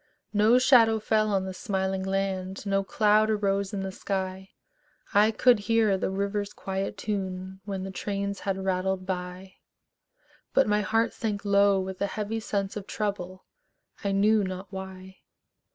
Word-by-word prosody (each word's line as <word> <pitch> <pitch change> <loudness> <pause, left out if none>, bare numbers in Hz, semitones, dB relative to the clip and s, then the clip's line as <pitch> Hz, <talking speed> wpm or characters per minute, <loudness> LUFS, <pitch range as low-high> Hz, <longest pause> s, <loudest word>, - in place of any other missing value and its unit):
No 215 +4 +5
shadow 235 -4 +5
fell 215 0 +1
on 190 -1 +1
the 190 - -5
smiling 190 0 -2
land, 190 0 -2
No 195 0 +1
cloud 215 +2 +3
arose 200 -2 0
in 195 -2 -3
the 190 - -4
sky; 190 0 -4 0.6
I 210 +2 +5
could 235 +1 +4
hear 220 -1 +2
the 190 - -1
river's 200 +1 -2
quiet 195 0 -4
tune 190 -2 -4
When 195 -2 -4
the 190 - -5
trains 200 0 -3
had 195 -1 -3
rattled 185 0 -1
by; 185 0 -5 1.0
But 270 - +5
my 210 0 +2
heart 225 +3 +1
sank 210 -2 -3
low 200 -1 +4
with 190 0 -5
a 200 - +2
heavy 215 +2 -3
sense 200 -3 -2
Of 200 -2 -6
trouble, 185 -3 -4 0.6
I 200 - 0
knew 210 +2 +3
not 185 +1 -6
why. 190 0 -8
195 Hz, 155 wpm, -27 LUFS, 190-210 Hz, 1.0 s, No